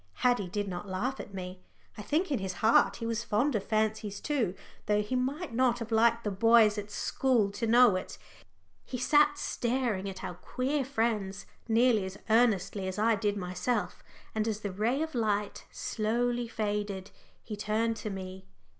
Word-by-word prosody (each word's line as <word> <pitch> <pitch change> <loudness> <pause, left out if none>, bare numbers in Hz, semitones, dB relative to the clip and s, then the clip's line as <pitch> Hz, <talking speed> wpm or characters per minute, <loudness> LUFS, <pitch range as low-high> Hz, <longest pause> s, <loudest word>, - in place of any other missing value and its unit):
Haddie 245 -6 +3
did 205 +3 -3
not 185 +1 -5
laugh 245 +9 -2
at - - -8
me. 185 -1 -7 0.3
I - - -7
think 310 - 0
in 275 - +1
his 190 -1 -3
heart 225 - +5
he 230 - -6
was 230 0 -1
fond 240 +6 +1
of 210 -4 -1
fancies 215 -1 -1
too, 240 -11 -1 0.3
though 210 0 +2
he 210 +5 -3
might 270 +4 -2
not 245 0 +2
have 230 -1 -6
liked 230 +1 +3
the 210 - -1
boys 220 +1 +5
at 205 0 -7
school 230 -1 +1
to 225 +3 -3
know 235 -2 +6
it. 185 - -5 0.7
He 250 - -5
sat 295 +3 +4
staring 235 -8 -1
at 190 - -8
our - - -4
queer 260 - -2
friends 225 -7 -1 0.2
nearly 230 -2 +3
as 190 +1 -6
earnestly 210 -4 +2
as 190 +1 -4
I 225 +2 +3
did 205 -1 0
myself. 180 +2 -2 0.3
And 220 0 -1
as 215 -1 -2
the 205 - -3
ray 230 +10 0
of 320 - -5
light 210 -4 -1
slowly 240 +2 -1
faded, 205 -3 -3 0.3
he 215 - -6
turned 220 +2 0
to 215 - -5
me. 190 -1 -7
220 Hz, 180 wpm, -30 LUFS, 200-245 Hz, 0.7 s, know